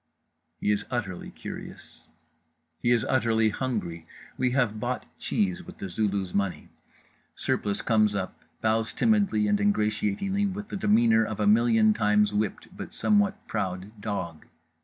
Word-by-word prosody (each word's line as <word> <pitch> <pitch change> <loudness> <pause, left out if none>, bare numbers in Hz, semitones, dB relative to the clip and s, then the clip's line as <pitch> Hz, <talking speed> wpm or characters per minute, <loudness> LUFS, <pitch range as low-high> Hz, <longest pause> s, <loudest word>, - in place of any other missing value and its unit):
He 105 - +1
is 105 0 0
utterly 110 -8 -3
curious. - - -9 0.7
He 120 - 0
is 120 -2 +3
utterly 115 -4 +2
hungry. 100 -9 -3 0.3
We 125 - +1
have 120 -5 +1
bought 125 +3 -2
cheese 190 -4 0
with - - -12
The 95 - -6
Zulu's 95 -1 -1
money. 100 -6 -1 0.7
Surplice 100 -1 0
comes 110 -3 +3
up, 95 -2 -4 0.2
bows 110 0 +1
timidly 200 - +2
and 105 0 +2
ingratiatingly 105 - +1
with 205 +2 -5
the - - -5
demeanour 120 - +4
of 110 -1 -4
a 105 - +1
million 110 0 +5
times 105 -1 +2
whipped 105 -1 -2
but - - -8
somewhat 205 0 +2
proud 95 -2 -3
dog. 85 -7 -4
110 Hz, 140 wpm, -27 LUFS, 105-125 Hz, 0.7 s, million